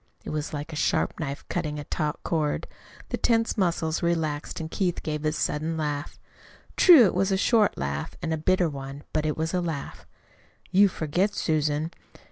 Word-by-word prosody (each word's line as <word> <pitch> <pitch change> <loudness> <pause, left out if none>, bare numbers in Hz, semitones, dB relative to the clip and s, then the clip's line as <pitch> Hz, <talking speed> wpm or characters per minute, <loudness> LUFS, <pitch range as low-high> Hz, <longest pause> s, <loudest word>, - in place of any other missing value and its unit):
It - - -4
was 155 0 -3
like 150 +2 -5
a - - -4
sharp 150 - 0
knife 140 -2 -4
cutting 150 -4 -2
a 145 - -5
taut 150 +1 -2
cord. 155 -3 -1 0.4
The - - -1
tense 230 -1 +2
muscles 170 -5 0
relaxed 160 -3 -1
and 160 0 -5
Keith 180 -4 -1
gave 150 -1 -3
a 155 - +2
sudden 155 +1 -1
laugh. 150 -2 -3 0.6
True, 325 -10 +8
it 190 - +1
was 195 +2 +1
a 190 - +3
short 215 +1 +3
laugh, 70 +1 -3
and 160 -1 -2
a - - 0
bitter 180 +3 +2
one; 140 -1 -7
but 155 0 +1
it 150 - -1
was 160 +2 -2
a 180 - +1
laugh. 160 -5 -5 0.6
"You 200 +2 +6
forget, 180 +4 -1
Susan. 155 -1 0
160 Hz, 185 wpm, -26 LUFS, 150-180 Hz, 0.6 s, True